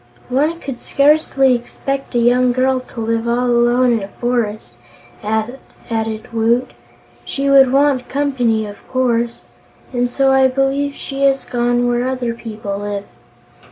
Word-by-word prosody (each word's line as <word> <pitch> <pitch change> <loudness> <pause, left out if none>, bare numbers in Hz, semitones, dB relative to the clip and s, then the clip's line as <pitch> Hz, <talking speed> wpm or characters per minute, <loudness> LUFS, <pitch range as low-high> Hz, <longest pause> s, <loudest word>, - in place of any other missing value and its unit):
"One 300 +6 0
could 265 -6 -7
scarcely 280 -2 +3
expect 270 +2 -4
a - - +3
young 245 +1 +3
girl 260 +1 +1
to 250 -2 -9
live 230 +1 -1
all 240 +1 +1
alone 240 +1 +3
in 225 - 0
a 195 - -5
forest," 230 -1 -3 0.5
added 220 0 -4
Woot. 230 +2 +1 0.5
"She 275 0 -1
would 270 -2 +6
want 275 -2 +2
company, 250 -6 0
of 205 -1 -9
course, 235 -2 -1 0.5
and 245 0 0
so 270 +2 +2
I 265 0 +5
believe 270 +2 0
she 275 0 -6
has 270 -1 +2
gone 245 0 0
where 245 +1 0
other 250 -3 -2
people 215 -4 -6
live." 205 -1 -4
245 Hz, 145 wpm, -18 LUFS, 230-270 Hz, 0.5 s, would